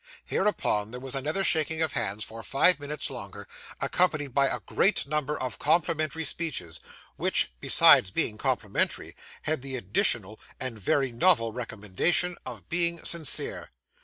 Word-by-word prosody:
Hereupon 105 - -1
there 125 +2 -7
was 130 0 -6
another 150 +8 -1
shaking 160 -2 +1
of 160 - -2
hands 105 +2 -2
for 115 +2 -9
five 145 +7 +2
minutes 145 +1 -4
longer, - - -9 0.3
accompanied 155 -7 0
by 140 0 +3
a - - -2
great 205 - +1
number 150 0 -2
of 130 -3 -5
complimentary 160 0 0
speeches, 140 - -4 0.4
which, - - +2
besides 95 - +7
being 105 +3 -1
complimentary, - - -1 0.3
had 155 -2 -2
the 135 0 -6
additional 110 -1 -1 0.2
and 125 -4 -3
very 135 +6 0
novel 115 -3 +2
recommendation 125 - 0
of 110 -9 -8
being 170 -1 0
sincere. 165 -5 +1
140 Hz, 140 wpm, -27 LUFS, 115-160 Hz, 0.4 s, besides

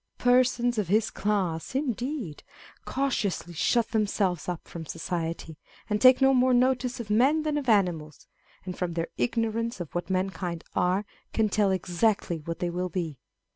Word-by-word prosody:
â€¢ - - -52
Persons 245 -1 +3
of 205 - -1
his 215 +4 +2
class, 195 -1 -1
indeed, 255 - -2 0.4
cautiously 220 -10 -1
shut 230 +8 +1
themselves 200 -5 0
up 175 -2 -5
from 170 - -7
society, 165 -1 -4 0.3
and 210 0 +1
take 255 +1 +8
no 270 0 +6
more 255 0 +4
notice 255 0 +1
of 215 -3 -5
men 275 +8 +3
than 305 -1 -1
of 285 -4 -1
animals: 175 -8 +1 0.4
and 180 -1 -5
from 180 -2 -2
their 165 0 -2
ignorance 230 -1 -1
of 175 -4 -6
what 175 0 -3
mankind 185 -2 -2
are, 185 +3 +1 0.3
can 220 -1 +2
tell 205 -1 +2
exactly 185 -1 0
what 165 +2 -5
they 175 - -2
will 180 +1 -2
be. 165 -7 -4
205 Hz, 165 wpm, -27 LUFS, 175-245 Hz, 0.4 s, take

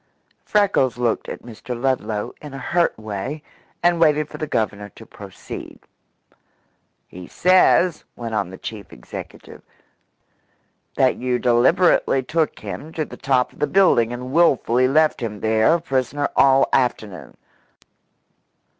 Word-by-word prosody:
Freckles 200 - +1
looked 120 -2 -1
at - - -8
Mr. 120 +1 -8
Ludlow 120 -5 -2
in 145 -2 -9
a 135 -2 -8
hurt 175 -1 +2
way, 110 +8 -6 0.4
and 175 -1 +3
waited 150 -1 +3
for - - -10
the 155 - -3
Governor 105 -5 -2
to - - -13
proceed. - - -10 1.3
"He 90 0 -11
says," 185 -1 +3
went 115 -2 -6
on 105 -4 -1
the 95 - -10
chief 105 -1 -8
executive, - - -11 1.4
"that 130 -1 +3
you 125 0 -1
deliberately 130 +4 +3
took 160 +3 -1
him 105 - -8
to 155 - -2
the - - -11
top 130 -2 0
of - - -21
the 150 - +1
building 175 -12 +3
and 125 +1 -6
wilfully 130 -6 +3
left 155 +1 +2
him 105 -3 -4
there 110 +8 +3
a - - -1
prisoner 135 -1 -1
all 135 0 +5
afternoon. 110 -7 -2
130 Hz, 135 wpm, -21 LUFS, 115-155 Hz, 1.4 s, all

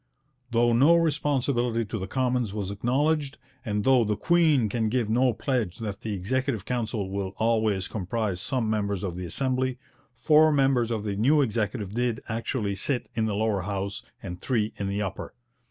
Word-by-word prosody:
Though 120 0 +3
no 140 +8 +6
responsibility 135 -7 +1
to 110 +2 -4
the 95 - -4
Commons 125 -4 0
was 100 -2 -3
acknowledged, 140 +7 0 0.3
and 105 -1 -1
though 130 -1 +5
'the 105 -1 0
Queen 155 -5 +3
can 110 +1 -1
give 115 -2 0
no 125 +2 +3
pledge 115 - -2
that 105 -2 -5
the 110 -3 -3
Executive 115 +2 -1
Council 110 -5 -2
will 100 -1 -3
always 110 -4 +1
comprise 105 -2 -2
some 125 -1 -1
members 100 -3 -1
of 90 -3 -3
the 90 -1 -5
Assembly,' 130 +3 -1 0.3
four 155 +6 +4
members 135 -5 +2
of 110 -3 -2
the 105 -2 -2
new 140 +9 +4
Executive 105 -3 -2
did 120 -1 0
actually 110 -2 -2
sit 125 +6 -2
in 110 -1 0
the 105 - -1
Lower 105 -2 0
House 100 +2 -3 0.2
and 90 -2 -7
three 110 -5 0
in 100 - -3
the 100 +1 -1
Upper. 95 -1 -6
115 Hz, 175 wpm, -26 LUFS, 100-130 Hz, 0.3 s, no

